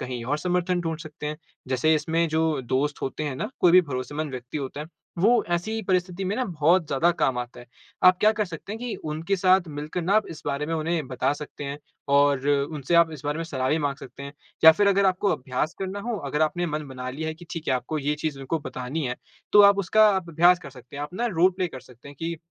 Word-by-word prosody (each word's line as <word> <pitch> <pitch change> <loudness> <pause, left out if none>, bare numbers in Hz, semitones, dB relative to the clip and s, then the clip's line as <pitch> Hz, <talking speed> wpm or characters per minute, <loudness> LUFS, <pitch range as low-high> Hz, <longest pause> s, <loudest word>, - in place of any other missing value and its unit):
कहीं 125 -2 -5
और 145 +4 -1
समर्थन 180 +1 0
ढूँढ 165 -2 -3
सकते 150 -2 -8
हैं। 150 0 -3 0.3
जैसे 130 +5 +2
इसमें 160 +2 +1
जो 160 -2 +1
दोस्त 140 +4 -1
होते 135 +3 -3
हैं 140 -3 -3
ना, - - -3
कोई 175 -1 +5
भी 185 - +9
भरोसेमंद 145 +1 -4
व्यक्ति 125 +2 -6
होता 140 +1 -5
है, 150 - -6 0.3
वो 230 +7 +4
ऐसी 215 +6 -1
परिस्थिति 185 -1 -1
में 195 +3 -1
ना 255 - 0
बहुत 170 -2 +2
ज़्यादा 155 +5 +2
काम 130 -7 0
आता 120 0 -6
है। 120 - -14 0.4
आप 185 0 +7
क्या 215 - +6
कर 210 -1 -1
सकते 175 +2 -8
हैं 220 - -5
कि 245 -2 -3
उनके 160 +5 -1
साथ 185 -1 +3
मिलकर 150 +4 -4
ना 190 +5 +1
आप 215 0 +3
इस 160 - -9
बारे 145 +1 -1
में 165 - -2
उन्हें 160 -1 -1
बता 130 +1 0
सकते 145 0 -8
हैं 140 +1 -5 0.4
और 140 -1 +3
उनसे 145 +2 0
आप 170 -1 +5
इस 145 -1 -10
बारे 145 +1 -1
में 165 - -3
सलाह 130 -5 -2
भी 155 - +2
माँग 145 -2 -1
सकते 135 +1 -11
हैं 140 - -7 0.3
या 160 - +11
फिर 205 +4 +2
अगर 200 0 +3
आपको 190 +2 +1
अभ्यास 130 +4 -3
करना 195 +1 -4
हो, 235 +2 -3
अगर 145 0 -1
आपने 175 +3 0
मन 150 -2 -3
बना 130 -1 -6
लिया 155 +4 -4
है 160 - -4
कि 175 - -14
ठीक 165 -1 -5
है 130 - +3
आपको 130 +5 -3
ये 145 +1 0
चीज़ 150 -1 -4
उनको 135 +4 -2
बतानी 140 +1 -5
है - - -3 0.4
तो 210 - +8
आप 200 0 +6
उसका 215 +3 +5
आप 185 -3 -4
अभ्यास 175 +3 +5
कर 140 - -9
सकते 125 +1 -13
हैं। 145 - -4
आप 145 - -4
अपना 235 +6 -1
रोल 180 +3 +5
प्ले 185 -1 0
कर 130 - -9
सकते 125 +1 -16
हैं 140 - -11
कि 165 0 -3
155 Hz, 255 wpm, -25 LUFS, 140-180 Hz, 0.4 s, या